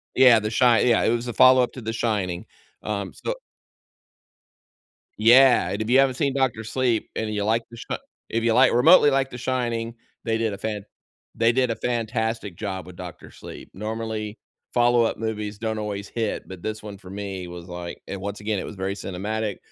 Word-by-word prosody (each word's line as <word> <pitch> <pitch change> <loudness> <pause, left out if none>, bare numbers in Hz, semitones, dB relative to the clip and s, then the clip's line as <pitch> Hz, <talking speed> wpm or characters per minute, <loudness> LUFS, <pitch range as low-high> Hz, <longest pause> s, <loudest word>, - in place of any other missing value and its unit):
Yeah, 125 -3 +7
The 110 +1 -3
Shine 120 +1 +4
yeah, 115 - +4
it - - +3
was 120 +1 -4
a 120 - -3
follow-up 130 +2 +6
to 130 - -8
The 110 0 -4
Shining, 100 -7 -1 0.4
um, 100 -4 -3
so - - -3 1.9
Yeah, 120 -4 +6
and 100 +2 -3
if 110 - -2
you 130 +2 +5
haven't 135 -2 +3
seen 140 -3 0
Doctor 130 -5 0
Sleep 120 0 0
and 110 -1 -2
you 105 -1 -1
like 115 +2 +2
The 115 - -11
Shi - - -4 0.3
if 115 0 0
you 115 -1 +3
like 130 +2 +5
remotely 145 +4 +7
like 135 0 +1
The 125 - -8
Shining, 120 -2 -2 0.3
they 115 -1 0
did 110 -2 0
a 100 - -6
fan 105 -1 -4 0.5
they 115 +1 +3
did 125 -1 +1
a 115 - -1
fantastic 115 -5 -2
job 95 -4 -5
with 90 -1 -12
Doctor 90 -2 -9
Sleep. - - -11
Normally, 110 +1 -4 0.3
follow-up 120 -1 +3
movies 105 -2 -4
don't 110 -1 -2
always 100 -1 -4
hit, 115 -2 -3
but 95 -2 -9
this 110 0 -4
one 105 -2 -8
for 90 - -13
me 95 -2 -5
was, 85 0 -9
like 90 -1 -7
and 100 - -5
once 100 +1 -5
again, 105 -1 -1
it - - -4
was 105 - -9
very 95 +1 -2
cinematic, 105 +2 -4
110 Hz, 200 wpm, -24 LUFS, 100-120 Hz, 1.9 s, Yeah